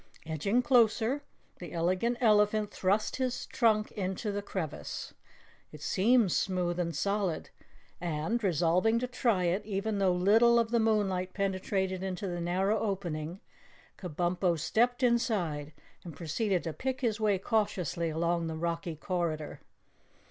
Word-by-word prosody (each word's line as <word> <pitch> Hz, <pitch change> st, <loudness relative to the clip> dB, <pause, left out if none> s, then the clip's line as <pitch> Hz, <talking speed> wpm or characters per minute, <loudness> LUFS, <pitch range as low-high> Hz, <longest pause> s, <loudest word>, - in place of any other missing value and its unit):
Edging 180 Hz, -, 0 dB
closer, 240 Hz, +2 st, +3 dB, 0.4 s
the 175 Hz, -, -8 dB
Elegant 185 Hz, +8 st, 0 dB
Elephant 210 Hz, -2 st, +3 dB
thrust 200 Hz, +3 st, 0 dB
his 255 Hz, -1 st, -2 dB
trunk 215 Hz, -3 st, +2 dB
into 195 Hz, +1 st, -3 dB
the 205 Hz, 0 st, -2 dB
crevice. 160 Hz, -, -5 dB, 0.6 s
It 150 Hz, -1 st, -11 dB
seemed 220 Hz, 0 st, +3 dB
smooth 180 Hz, -1 st, 0 dB
and 170 Hz, -2 st, -1 dB
solid, 200 Hz, +1 st, -1 dB, 0.5 s
and, 175 Hz, +7 st, -2 dB
resolved 180 Hz, +5 st, +2 dB
to -, -, 0 dB
try 240 Hz, -6 st, +1 dB
it 180 Hz, +4 st, 0 dB
even 205 Hz, 0 st, -2 dB
though 190 Hz, -2 st, +3 dB
little 220 Hz, +7 st, +5 dB
of 230 Hz, -1 st, +1 dB
the 235 Hz, -, +3 dB
moonlight 195 Hz, -5 st, +1 dB
penetrated 190 Hz, -1 st, -1 dB
into 190 Hz, +1 st, -4 dB
the 175 Hz, -1 st, -3 dB
narrow 190 Hz, +5 st, +1 dB
opening, 180 Hz, -4 st, -3 dB, 0.6 s
Kabumpo 175 Hz, 0 st, 0 dB
stepped 240 Hz, -, +1 dB
inside 205 Hz, -12 st, +1 dB, 0.3 s
and 165 Hz, -4 st, -9 dB
proceeded 175 Hz, +4 st, -1 dB
to 165 Hz, -, -4 dB
pick 260 Hz, -, -3 dB
his 225 Hz, -3 st, 0 dB
way 210 Hz, -3 st, +2 dB
cautiously 185 Hz, -, -1 dB
along 170 Hz, +1 st, 0 dB
the 160 Hz, -, -4 dB
rocky 170 Hz, 0 st, -3 dB
corridor. 165 Hz, -2 st, -3 dB
190 Hz, 135 wpm, -30 LUFS, 170-220 Hz, 0.6 s, little